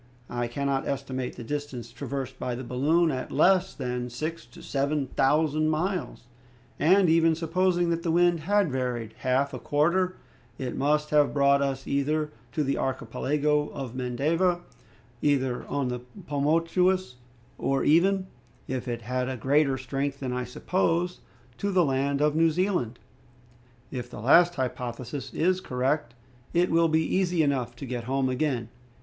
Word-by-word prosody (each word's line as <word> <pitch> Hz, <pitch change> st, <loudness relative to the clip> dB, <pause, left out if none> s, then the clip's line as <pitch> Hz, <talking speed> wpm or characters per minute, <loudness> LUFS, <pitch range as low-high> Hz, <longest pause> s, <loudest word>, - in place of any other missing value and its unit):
I 120 Hz, 0 st, -1 dB
cannot 135 Hz, +2 st, -1 dB
estimate 130 Hz, -2 st, -3 dB
the 120 Hz, -, -8 dB
distance 135 Hz, -3 st, -5 dB
traversed 130 Hz, +1 st, -5 dB
by 125 Hz, -1 st, -2 dB
the 130 Hz, -, -6 dB
balloon 150 Hz, +7 st, +2 dB
at 130 Hz, -2 st, -4 dB
less 185 Hz, +6 st, +3 dB
than 125 Hz, -2 st, -3 dB
six 155 Hz, +3 st, -5 dB
to 120 Hz, -, -14 dB
seven 140 Hz, +1 st, 0 dB
thousand 155 Hz, +3 st, +2 dB
miles, 175 Hz, +1 st, -2 dB, 0.6 s
and, 185 Hz, +4 st, +5 dB
even 165 Hz, 0 st, +4 dB
supposing 175 Hz, +1 st, +1 dB
that 165 Hz, 0 st, -1 dB
the 170 Hz, -, -2 dB
wind 175 Hz, 0 st, +3 dB
had 195 Hz, +1 st, +2 dB
varied 125 Hz, -4 st, -2 dB
half 130 Hz, +2 st, +1 dB
a 125 Hz, -, -5 dB
quarter, 175 Hz, +8 st, +1 dB, 0.4 s
it 130 Hz, -2 st, -4 dB
must 150 Hz, +2 st, +1 dB
have 150 Hz, -1 st, +3 dB
brought 140 Hz, 0 st, +4 dB
us 135 Hz, -1 st, -1 dB
either 150 Hz, +2 st, 0 dB, 0.2 s
to 150 Hz, -, 0 dB
the 140 Hz, 0 st, -1 dB
archipelago 145 Hz, +4 st, 0 dB
of 135 Hz, -4 st, -5 dB
Mendava, 155 Hz, +8 st, 0 dB, 0.6 s
either 135 Hz, -4 st, +1 dB
on 140 Hz, -3 st, -1 dB
the 125 Hz, 0 st, -3 dB, 0.3 s
Pomotous, 165 Hz, +2 st, +1 dB, 0.4 s
or 135 Hz, 0 st, +1 dB
even, 185 Hz, +5 st, +3 dB, 0.4 s
if 130 Hz, 0 st, -3 dB
it 120 Hz, -1 st, -3 dB
had 125 Hz, +2 st, -2 dB
a 130 Hz, -, -3 dB
greater 135 Hz, +2 st, +2 dB
strength 135 Hz, +2 st, -3 dB
than 130 Hz, -2 st, -3 dB
I 125 Hz, 0 st, -2 dB
suppose, 175 Hz, +6 st, 0 dB, 0.4 s
to 200 Hz, -, -1 dB
the 180 Hz, -3 st, +4 dB
land 140 Hz, +1 st, 0 dB
of 150 Hz, 0 st, +2 dB
New 165 Hz, +1 st, +4 dB
Zealand. 170 Hz, -, 0 dB, 0.9 s
If 125 Hz, -2 st, -5 dB
the -, -, -9 dB
last 170 Hz, +9 st, +5 dB
hypothesis 130 Hz, +1 st, -4 dB
is 185 Hz, +3 st, +1 dB
correct, 130 Hz, -2 st, -1 dB, 0.4 s
it 175 Hz, +1 st, +3 dB
will 165 Hz, 0 st, +4 dB
be 160 Hz, 0 st, +2 dB
easy 180 Hz, -3 st, +1 dB
enough 130 Hz, -4 st, -1 dB
to 130 Hz, -, -7 dB
get 120 Hz, -2 st, -4 dB
home 135 Hz, +1 st, 0 dB
again. 130 Hz, -3 st, -1 dB
140 Hz, 155 wpm, -27 LUFS, 130-165 Hz, 0.9 s, and